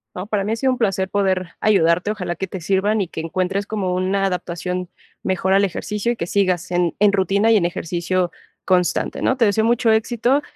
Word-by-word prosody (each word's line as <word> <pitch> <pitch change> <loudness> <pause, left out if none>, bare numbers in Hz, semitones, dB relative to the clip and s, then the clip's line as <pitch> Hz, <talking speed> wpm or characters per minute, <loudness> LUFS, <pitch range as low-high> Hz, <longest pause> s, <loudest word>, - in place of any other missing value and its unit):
No, 180 - -5
para 210 -2 0
mí 210 - -2
ha - - 0
sido 260 +3 +1
un 255 - -1
placer 195 -5 0
poder 190 -3 0
ayudarte. 180 -2 +3
Ojalá 180 -5 -4
que 190 +3 -4
te 190 0 -7
sirvan 200 +4 +1
y 190 - -2
que 160 - -6
encuentres 185 +4 -2
como 195 -4 -2
una 190 +2 0
adaptación 180 -1 -3 0.3
mejor 190 0 0
al 195 +1 +4
ejercicio, 210 +4 -2
y - - -2
que 225 - -3
sigas 185 -2 0
en 175 -2 +1
en 205 0 +4
rutina 200 +3 +2
y 225 - +6
en 180 - +1
ejercicio 175 +1 -1 0.3
constante, 180 -2 +1
¿no? 260 - +1
Te 235 - +4
deseo 210 +1 +2
mucho 235 0 +3
éxito, 240 +5 +2
190 Hz, 210 wpm, -20 LUFS, 180-210 Hz, 0.3 s, y